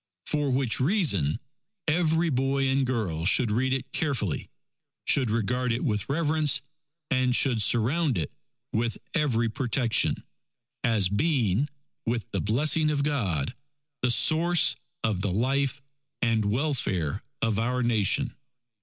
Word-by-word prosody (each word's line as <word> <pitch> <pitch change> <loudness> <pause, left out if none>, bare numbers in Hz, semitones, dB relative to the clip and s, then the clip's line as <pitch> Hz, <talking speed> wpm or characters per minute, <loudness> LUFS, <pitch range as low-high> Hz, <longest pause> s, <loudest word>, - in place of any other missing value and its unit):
For 150 -2 0
which 130 -3 +1
reason 130 - +1 0.5
every 160 +1 +2
boy 135 +1 +1
and 135 0 +1
girl 100 -11 -2
should 105 +5 +3
read 130 +4 +1
it 135 0 -2
carefully, 130 - -1 0.6
should 130 -5 +3
regard 120 +3 0
it 115 +2 -1
with 105 -7 -1
reverence, 155 -1 +2 0.5
and 130 -2 +2
should 125 -5 +2
surround 125 - +2
it 80 -4 -2 0.4
with 115 +1 -1 0.2
every 125 -8 +1
protection, 120 0 +1 0.6
as 110 -5 +3
being, 125 - +1 0.3
with 115 -1 -2
the - - -1
blessing 150 +8 +2
of 145 -2 0
God, 105 - -1 0.5
the 125 - +1
source 165 +7 +4 0.3
of 105 -5 0
the 100 -1 -1
life 135 +6 0 0.4
and 115 -3 +1
welfare 105 - -1 0.2
of 110 -2 +1
our 125 +2 0
Nation. 115 +3 +2
125 Hz, 125 wpm, -27 LUFS, 110-145 Hz, 0.6 s, source